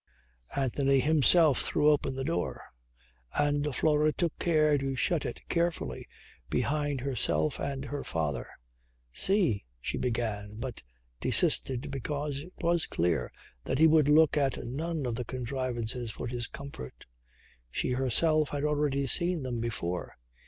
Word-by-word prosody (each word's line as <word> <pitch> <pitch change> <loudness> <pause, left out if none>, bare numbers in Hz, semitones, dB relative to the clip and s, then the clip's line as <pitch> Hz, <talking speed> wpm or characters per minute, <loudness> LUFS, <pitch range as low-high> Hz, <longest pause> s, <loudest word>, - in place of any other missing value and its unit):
Anthony 135 0 +2
himself 155 +1 +6
threw 150 +1 +3
open 140 -3 0
the 135 - -3
door 90 -8 -2 0.7
and 145 0 +1
Flora 155 0 +3
took 170 0 -2
care 155 -3 +3
to 135 0 -2
shut 160 +3 0
it - - -7
carefully 170 -1 -1 0.4
behind 145 -2 -1
herself 85 - 0
and 140 -1 -3
her 145 0 -4
father. 75 -7 -2 0.7
"See," 185 - +2 0.2
she - - -3
began 110 -4 -2
but 120 +2 -6 0.4
desisted 130 +1 +1
because 140 +1 -3
it 175 +6 -11
was 170 -1 +1
clear 85 -1 0 0.3
that 130 - -1
he 160 - +6
would 155 -2 +5
look 155 0 +5
at 135 -3 0
none 155 +4 -3
of 120 - -1
the 125 +2 -3
contrivances 125 -1 -4
for 110 - -6
his 120 -1 -3
comfort. 140 - -9 0.6
She 95 - -2
herself 145 +4 +2
had 145 -1 -3
hardly 145 -2 +1
seen 170 +3 +2
them 125 -2 -3
before. 90 -6 -3
140 Hz, 140 wpm, -29 LUFS, 120-150 Hz, 0.7 s, himself